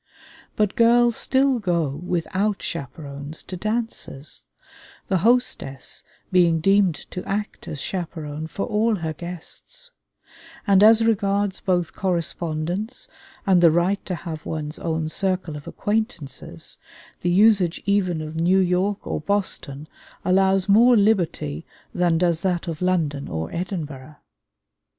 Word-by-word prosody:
But 210 Hz, -2 st, +1 dB
girls 235 Hz, 0 st, +5 dB
still 265 Hz, -1 st, +2 dB
go 175 Hz, -6 st, +1 dB
without 180 Hz, +7 st, -2 dB
chaperons 145 Hz, 0 st, -6 dB
to 185 Hz, -, -7 dB
dances, 215 Hz, -, -3 dB, 0.6 s
the 190 Hz, -, +2 dB
hostess 225 Hz, -, +1 dB, 0.3 s
being 170 Hz, -3 st, +4 dB
deemed 195 Hz, 0 st, +4 dB, 0.2 s
to 180 Hz, -, -5 dB
act 205 Hz, +1 st, -4 dB
as 150 Hz, -, -5 dB
chaperon 160 Hz, -3 st, -4 dB
for 195 Hz, -, -3 dB
all 220 Hz, 0 st, +2 dB
her 160 Hz, -4 st, -3 dB
guests; 175 Hz, -, -7 dB, 0.7 s
and 200 Hz, -2 st, +5 dB
as 225 Hz, +1 st, +7 dB
regards 200 Hz, -2 st, +1 dB
both 180 Hz, -3 st, 0 dB
correspondence 175 Hz, +2 st, -2 dB, 0.4 s
and 185 Hz, -3 st, +4 dB
the 170 Hz, -, +8 dB
right 175 Hz, +5 st, +1 dB
to 185 Hz, -, -1 dB
have 160 Hz, -3 st, -6 dB
one's 155 Hz, -1 st, -4 dB
own 160 Hz, -1 st, -1 dB
circle 185 Hz, -1 st, -1 dB
of 145 Hz, -, -9 dB
acquaintances, 210 Hz, -, -3 dB, 0.4 s
the 175 Hz, -, 0 dB
usage 195 Hz, -2 st, +4 dB
even 190 Hz, -5 st, +1 dB
of 155 Hz, +1 st, -7 dB
New 175 Hz, +4 st, +3 dB
York 190 Hz, +2 st, +1 dB
or -, -, -2 dB
Boston 155 Hz, -6 st, -2 dB, 0.4 s
allows 190 Hz, +1 st, +3 dB
more 230 Hz, +4 st, +6 dB
liberty 175 Hz, -, +1 dB, 0.3 s
than 175 Hz, -2 st, +2 dB
does 170 Hz, -1 st, +1 dB
that 180 Hz, -1 st, -1 dB
of 165 Hz, -1 st, -4 dB
London 160 Hz, -6 st, 0 dB
or 80 Hz, 0 st, -4 dB
Edinburgh. 155 Hz, -6 st, -5 dB
180 Hz, 125 wpm, -23 LUFS, 160-200 Hz, 0.7 s, the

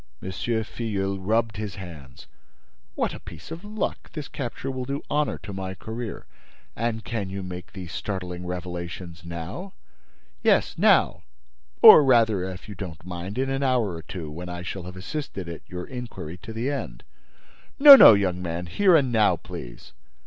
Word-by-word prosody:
Filleul 100 Hz, -, -3 dB
rubbed 110 Hz, +2 st, 0 dB
his 105 Hz, -2 st, -5 dB
hands. 80 Hz, -9 st, -10 dB, 0.7 s
"What -, -, -1 dB
a -, -, -8 dB
piece -, -, -12 dB
of 165 Hz, +3 st, -7 dB
luck! 210 Hz, 0 st, -4 dB
This 150 Hz, -3 st, -5 dB
capture 135 Hz, 0 st, -5 dB
will 130 Hz, -1 st, -4 dB
do 140 Hz, +2 st, -4 dB
honor 150 Hz, 0 st, +1 dB
to 100 Hz, -, -7 dB
my 95 Hz, 0 st, -5 dB
career. 110 Hz, +3 st, -6 dB, 0.5 s
And 115 Hz, 0 st, -2 dB
can 110 Hz, -5 st, -3 dB
you 95 Hz, 0 st, -5 dB
make 90 Hz, -1 st, -7 dB
me 95 Hz, -, -9 dB
these 85 Hz, -, -9 dB
startling 90 Hz, -3 st, -5 dB
revelations 90 Hz, -1 st, -6 dB
now?" 85 Hz, -, -7 dB, 0.7 s
"Yes, -, -, +3 dB
now—or -, -, +5 dB
rather, 115 Hz, -7 st, +4 dB
if 95 Hz, 0 st, -7 dB
you 105 Hz, -, -7 dB
do 95 Hz, -1 st, -5 dB
not 80 Hz, -1 st, -12 dB
mind, 90 Hz, +4 st, -6 dB
in 135 Hz, +1 st, 0 dB
an 135 Hz, +1 st, -1 dB
hour 125 Hz, -8 st, +1 dB
or 85 Hz, -, -6 dB
two, 80 Hz, -1 st, -7 dB
when 85 Hz, +3 st, -7 dB
I 90 Hz, 0 st, -6 dB
shall 90 Hz, 0 st, -6 dB
have 90 Hz, 0 st, -8 dB
assisted 100 Hz, -, -5 dB
at 85 Hz, -1 st, -7 dB
your 90 Hz, -1 st, -5 dB
inquiry 120 Hz, -, -7 dB
to 105 Hz, +4 st, -9 dB
the 115 Hz, +5 st, -2 dB
end." 115 Hz, -, -5 dB, 0.7 s
"No, 285 Hz, 0 st, +12 dB
no, 115 Hz, -, +10 dB
young 90 Hz, -3 st, 0 dB
man, 85 Hz, 0 st, -4 dB
here 185 Hz, -, +4 dB
and 135 Hz, -5 st, +3 dB
now, 105 Hz, -5 st, +4 dB
please." -, -, -10 dB
95 Hz, 170 wpm, -25 LUFS, 90-120 Hz, 0.7 s, No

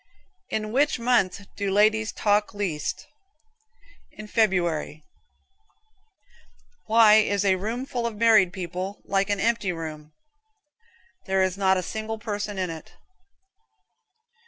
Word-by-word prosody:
In 215 Hz, 0 st, -3 dB
which 285 Hz, +5 st, +2 dB
month 230 Hz, -6 st, +1 dB
do 200 Hz, -1 st, -2 dB
ladies 215 Hz, +2 st, +2 dB
talk 210 Hz, 0 st, 0 dB
least? 180 Hz, -8 st, -3 dB, 1.1 s
In 215 Hz, -, -10 dB
February. 175 Hz, -8 st, 0 dB, 1.8 s
Why 220 Hz, -1 st, +6 dB
is 205 Hz, -2 st, +1 dB
a 190 Hz, -1 st, +4 dB
room 225 Hz, +7 st, -4 dB
full 240 Hz, -3 st, -3 dB
of 230 Hz, -, -6 dB
married 215 Hz, -5 st, +5 dB, 0.2 s
folks 190 Hz, +3 st, -5 dB
like 195 Hz, +1 st, 0 dB
an 205 Hz, -1 st, 0 dB
empty 230 Hz, -4 st, 0 dB
room? 155 Hz, -2 st, -8 dB, 1.1 s
There 190 Hz, 0 st, +2 dB
is 185 Hz, -1 st, -1 dB
not 190 Hz, -1 st, +2 dB
a 185 Hz, -, -2 dB
single 220 Hz, +4 st, -5 dB
person 205 Hz, -2 st, -4 dB
in 185 Hz, -2 st, -2 dB
it. 160 Hz, -1 st, -10 dB
205 Hz, 120 wpm, -25 LUFS, 185-220 Hz, 1.8 s, Why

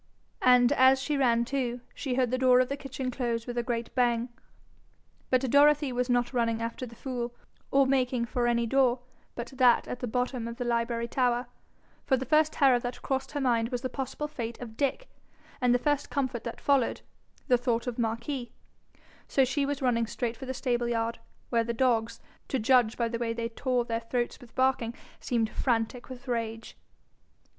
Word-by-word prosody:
And 250 Hz, 0 st, +6 dB
as 260 Hz, -1 st, +5 dB
she 295 Hz, +2 st, -1 dB
ran 235 Hz, -4 st, +3 dB
too, 250 Hz, -2 st, -2 dB
she 260 Hz, -4 st, -3 dB
heard 250 Hz, -2 st, +1 dB
the 255 Hz, -, +1 dB
door 255 Hz, -1 st, +5 dB
of 255 Hz, -, +2 dB
the 280 Hz, -, -1 dB
kitchen 270 Hz, -2 st, -5 dB
close 235 Hz, -2 st, -2 dB
with 245 Hz, -, -5 dB
a 240 Hz, -, +1 dB
great 235 Hz, -1 st, -3 dB
bang. 240 Hz, -1 st, +1 dB, 1.0 s
But 255 Hz, -1 st, +3 dB
Dorothy 290 Hz, -1 st, +5 dB
was 250 Hz, +1 st, -1 dB
not 245 Hz, +1 st, +1 dB
running 230 Hz, -2 st, +1 dB
after 230 Hz, +2 st, -4 dB
the 235 Hz, -, -13 dB
fool, 240 Hz, -1 st, -4 dB, 0.3 s
or 275 Hz, 0 st, +4 dB
making 255 Hz, -2 st, +1 dB
for 240 Hz, +1 st, -1 dB
any 235 Hz, 0 st, +2 dB
door 255 Hz, 0 st, +2 dB, 0.3 s
but 240 Hz, +2 st, -6 dB
that 250 Hz, -2 st, +5 dB
at 250 Hz, -, -5 dB
the 250 Hz, -, -3 dB
bottom 250 Hz, 0 st, -2 dB
of 235 Hz, 0 st, -7 dB
the 245 Hz, -, -3 dB
library 235 Hz, 0 st, 0 dB
tower; 245 Hz, 0 st, +1 dB, 0.6 s
for 265 Hz, -, +2 dB
the 260 Hz, -, -4 dB
first 310 Hz, +3 st, +3 dB
terror 265 Hz, -4 st, +4 dB
that 245 Hz, +1 st, -6 dB
crossed 265 Hz, +1 st, -2 dB
her 290 Hz, -, -1 dB
mind 235 Hz, -4 st, +1 dB
was 245 Hz, -2 st, -3 dB
the 255 Hz, -, -2 dB
possible 270 Hz, +2 st, -3 dB
fate 235 Hz, -6 st, -6 dB
of 230 Hz, -3 st, -8 dB
Dick, 285 Hz, -, -1 dB, 0.5 s
and 250 Hz, -1 st, +3 dB
the 245 Hz, -, +5 dB
first 290 Hz, +2 st, 0 dB
comfort 260 Hz, -4 st, -2 dB
that 235 Hz, -, -5 dB
followed, 275 Hz, -4 st, +1 dB, 0.5 s
the 250 Hz, -, +5 dB
thought 235 Hz, -1 st, 0 dB
of 245 Hz, -1 st, -4 dB
Marquis; 235 Hz, +3 st, -2 dB, 0.8 s
so 270 Hz, -, +3 dB
she 275 Hz, +2 st, 0 dB
was 285 Hz, -1 st, -3 dB
running 230 Hz, -2 st, +2 dB
straight 235 Hz, 0 st, -3 dB
for 265 Hz, -, -9 dB
the 260 Hz, -, -2 dB
stable 240 Hz, -2 st, 0 dB
yard, 230 Hz, 0 st, -1 dB, 0.3 s
where 230 Hz, -1 st, +3 dB
the 235 Hz, +1 st, -2 dB
dogs, 230 Hz, -2 st, +1 dB, 0.3 s
to 265 Hz, -, -1 dB
judge 240 Hz, -1 st, +3 dB
by 235 Hz, -, +1 dB
the 230 Hz, 0 st, -4 dB
way 230 Hz, -1 st, -1 dB
they 230 Hz, 0 st, -3 dB
tore 250 Hz, +1 st, -1 dB
their 230 Hz, -1 st, -1 dB
throats 240 Hz, +1 st, -2 dB
with 240 Hz, -2 st, -16 dB
barking, 260 Hz, -3 st, +1 dB, 0.2 s
seemed 230 Hz, -3 st, 0 dB
frantic 240 Hz, 0 st, -1 dB
with 255 Hz, +1 st, -10 dB
rage. 225 Hz, -2 st, -3 dB
245 Hz, 195 wpm, -28 LUFS, 235-260 Hz, 1.0 s, And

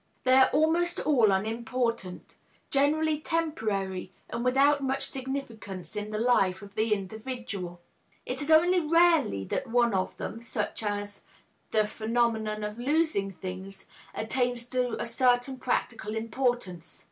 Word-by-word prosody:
They 255 Hz, -, +4 dB
are 260 Hz, 0 st, +7 dB
almost 330 Hz, +4 st, +2 dB
all 240 Hz, -9 st, +4 dB
unimportant, 225 Hz, -1 st, -2 dB, 0.3 s
generally 300 Hz, +2 st, +2 dB
temporary 215 Hz, -, -2 dB, 0.2 s
and 235 Hz, -, -3 dB
without 275 Hz, +3 st, +4 dB
much 270 Hz, 0 st, 0 dB
significance 250 Hz, -8 st, -5 dB
in 210 Hz, 0 st, -3 dB
the 215 Hz, -, -3 dB
life 200 Hz, -5 st, +2 dB
of 200 Hz, 0 st, -12 dB
the 220 Hz, +1 st, 0 dB
individual. 205 Hz, -3 st, -4 dB, 0.4 s
It -, -, -4 dB
is 290 Hz, -, -4 dB
only 350 Hz, +3 st, +6 dB
rarely 330 Hz, -, +3 dB
that 270 Hz, -, -2 dB
one 235 Hz, -1 st, +3 dB
of 185 Hz, -1 st, -1 dB
them, 225 Hz, -, -5 dB
such 235 Hz, -, -3 dB
as 205 Hz, -1 st, -3 dB, 0.5 s
the 215 Hz, -1 st, +2 dB
phenomenon 220 Hz, -1 st, -1 dB
of 210 Hz, +2 st, -5 dB
losing 290 Hz, -6 st, +1 dB
things, 190 Hz, +1 st, -7 dB, 0.3 s
attains 245 Hz, +1 st, 0 dB
to 250 Hz, -1 st, -1 dB
a -, -, -2 dB
certain 245 Hz, +2 st, +1 dB
practical 225 Hz, -3 st, -2 dB
importance. 225 Hz, -, -2 dB
235 Hz, 135 wpm, -28 LUFS, 205-270 Hz, 0.5 s, are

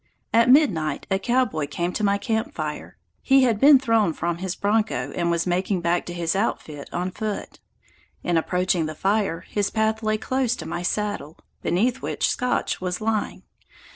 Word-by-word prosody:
At 230 Hz, +1 st, +5 dB
midnight 175 Hz, -, +3 dB
a 190 Hz, -, +2 dB
cowboy 220 Hz, -, 0 dB
came 170 Hz, +5 st, -2 dB
to 215 Hz, -, -2 dB
my 200 Hz, 0 st, +3 dB
camp 220 Hz, +2 st, -2 dB
fire. -, -, -5 dB, 0.2 s
He 270 Hz, 0 st, +4 dB
had 230 Hz, -5 st, +2 dB
been 285 Hz, +2 st, +8 dB
thrown 225 Hz, -8 st, +2 dB
from 170 Hz, +1 st, -2 dB
his 185 Hz, -1 st, -3 dB
bronco 205 Hz, -, 0 dB
and 170 Hz, -1 st, 0 dB
was 170 Hz, -1 st, +1 dB
making 185 Hz, +1 st, 0 dB
back 170 Hz, +1 st, 0 dB
to 175 Hz, -, -5 dB
his 170 Hz, -1 st, -1 dB
outfit 155 Hz, -8 st, -3 dB
on 180 Hz, +1 st, -2 dB
foot. 210 Hz, +2 st, -5 dB, 0.6 s
In 175 Hz, -, 0 dB
approaching 180 Hz, 0 st, +1 dB
the 155 Hz, -, -6 dB
fire 195 Hz, -2 st, 0 dB
his 205 Hz, -1 st, -2 dB
path 220 Hz, 0 st, 0 dB
lay 215 Hz, -1 st, 0 dB
close 255 Hz, +1 st, 0 dB
to -, -, -8 dB
my 175 Hz, -, -4 dB
saddle, 190 Hz, -4 st, -2 dB, 0.2 s
beneath 235 Hz, +9 st, 0 dB
which -, -, -1 dB
Scotch 250 Hz, -7 st, -1 dB
was 180 Hz, 0 st, -2 dB
lying. 220 Hz, -1 st, -2 dB
200 Hz, 175 wpm, -24 LUFS, 175-225 Hz, 0.6 s, been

